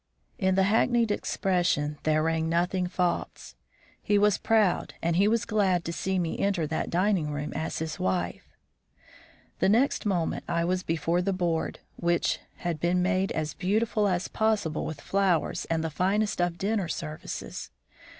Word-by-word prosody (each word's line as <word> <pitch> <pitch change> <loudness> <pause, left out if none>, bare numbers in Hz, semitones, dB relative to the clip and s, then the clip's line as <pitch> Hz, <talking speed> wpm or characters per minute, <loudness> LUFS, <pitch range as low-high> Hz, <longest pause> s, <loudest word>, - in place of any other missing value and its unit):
In 190 -1 +2
the 190 - +4
hackneyed 230 +2 +3
expression 175 -8 0
there 155 0 +2
rang 160 0 0
nothing 180 +2 +1
false. 175 - -2 0.5
He 205 - +2
was 205 -1 +3
proud 215 -5 +2
and 170 0 0
he 195 +4 +4
was 225 0 +1
glad 195 -6 +1
to 170 - -3
see 190 +2 -1
me 170 -3 -2
enter 195 -5 +1
that 155 +1 -2
dining 180 -3 +1
room 145 0 -4
as 160 +2 -3
his 160 -1 -4
wife. 90 -2 -2 1.1
The - - +3
next 230 +1 +2
moment 175 -5 0
I 170 0 0
was 180 +1 0
before 165 +1 0
the 195 +2 0
board, 170 -3 -1 0.2
which 170 -1 +1 0.2
had 170 -3 -3
been 180 +2 +1
made 190 0 +1
as 155 -1 -2
beautiful 210 +2 +1
as 180 -1 0
possible 215 -8 0
with 155 -2 -6
flowers 195 -4 +1
and 165 -1 -1
the 160 - -2
finest 195 +4 +1
of 175 -1 0
dinner 200 -1 0
services. 75 - -6
180 Hz, 160 wpm, -27 LUFS, 160-200 Hz, 1.1 s, the